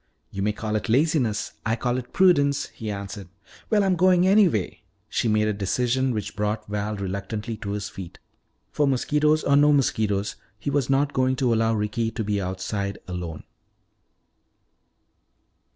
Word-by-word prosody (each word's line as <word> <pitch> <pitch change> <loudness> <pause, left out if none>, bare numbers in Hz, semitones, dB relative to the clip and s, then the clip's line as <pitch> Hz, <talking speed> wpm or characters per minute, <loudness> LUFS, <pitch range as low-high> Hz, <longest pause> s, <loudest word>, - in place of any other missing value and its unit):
"You 95 - -4
may 105 +2 +1
call 110 0 -3
it 105 -2 -2
laziness; 130 -4 +1
I 110 +1 +1
call 125 +1 -1
it 125 -1 -10
prudence," 145 -7 +3
he 110 - -7
answered. 100 -1 -6 0.4
"Well, 210 -2 +3
I'm 190 -1 +2
going 180 0 +4
anyway," 190 - +3 0.3
she 115 - -1
made 105 0 +2
a 105 - +1
decision 125 +6 0
which 105 -5 -3
brought 105 0 -2
Val 105 +1 -2
reluctantly 100 +3 -4
to 100 -1 -5
his 105 -1 -3
feet. 95 -3 -9 0.5
For 145 - +1
mosquitoes 150 +3 +2
or 140 - +3
no 145 +1 +5
mosquitoes, 110 -7 +1 0.2
he 125 +7 -3
was 140 -2 0
not 140 +1 +2
going 130 0 +2
to 125 -2 +1
allow 115 0 +2
Ricky 110 +2 -1
to 115 0 -4
be 100 -1 -1
outside 95 +2 -3
alone. 90 -4 -5
110 Hz, 160 wpm, -24 LUFS, 105-140 Hz, 0.5 s, no